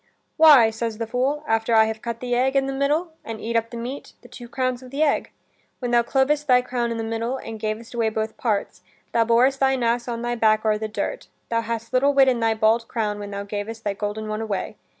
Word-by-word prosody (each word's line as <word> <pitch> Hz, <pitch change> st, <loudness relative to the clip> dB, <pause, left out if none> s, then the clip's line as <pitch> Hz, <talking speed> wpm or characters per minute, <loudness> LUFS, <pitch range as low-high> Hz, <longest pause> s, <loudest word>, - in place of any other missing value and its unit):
"Why," 290 Hz, -8 st, +7 dB
says 225 Hz, 0 st, -4 dB
the 230 Hz, -, -3 dB
fool, 265 Hz, +6 st, -1 dB
"after 225 Hz, +1 st, +1 dB
I 220 Hz, 0 st, +6 dB
have 220 Hz, 0 st, -4 dB
cut 235 Hz, -1 st, -5 dB
the 245 Hz, -1 st, -2 dB
egg 260 Hz, +3 st, +1 dB
i' -, -, +7 dB
the 270 Hz, 0 st, -3 dB
middle, 295 Hz, +5 st, 0 dB
and 225 Hz, -1 st, -6 dB
eat 230 Hz, +2 st, -4 dB
up 230 Hz, 0 st, +1 dB
the 235 Hz, -, -7 dB
meat, 250 Hz, +4 st, -6 dB
the -, -, -13 dB
two 240 Hz, -2 st, -11 dB
crowns 255 Hz, -1 st, -2 dB
of 255 Hz, -, -12 dB
the 280 Hz, +4 st, 0 dB
egg. 290 Hz, -, +1 dB, 0.5 s
When 245 Hz, -2 st, -3 dB
thou 240 Hz, 0 st, +5 dB
clovest 280 Hz, +5 st, +1 dB
thy 250 Hz, -1 st, +5 dB
crown 245 Hz, -2 st, -2 dB
i' -, -, -2 dB
the 225 Hz, -, -3 dB
middle, 225 Hz, +3 st, -2 dB
and 225 Hz, -4 st, -8 dB
gavest 220 Hz, +3 st, -4 dB
away 230 Hz, -2 st, +1 dB
both 220 Hz, 0 st, -3 dB
parts, 225 Hz, -9 st, -2 dB, 0.3 s
thou 230 Hz, -1 st, +2 dB
borest 250 Hz, +4 st, +3 dB
thine 265 Hz, -2 st, +2 dB
ass 235 Hz, +1 st, 0 dB
on 235 Hz, -1 st, -4 dB
thy 240 Hz, 0 st, -1 dB
back 220 Hz, -2 st, +2 dB
o'er 215 Hz, -1 st, +2 dB
the 220 Hz, -, -3 dB
dirt: 220 Hz, -, -4 dB, 0.2 s
thou 230 Hz, 0 st, +1 dB
hadst 230 Hz, +1 st, -5 dB
little 275 Hz, +2 st, +3 dB
wit 270 Hz, -1 st, +6 dB
in 245 Hz, -2 st, 0 dB
thy 225 Hz, -1 st, +1 dB
bald 225 Hz, +1 st, +2 dB
crown 210 Hz, -3 st, -2 dB
when 205 Hz, 0 st, -6 dB
thou 200 Hz, 0 st, -5 dB
gavest 210 Hz, +2 st, -6 dB
thy 205 Hz, -, -1 dB
golden 210 Hz, +2 st, -4 dB
one 215 Hz, +1 st, -3 dB
away. 215 Hz, -3 st, -3 dB
230 Hz, 250 wpm, -23 LUFS, 220-255 Hz, 0.5 s, Why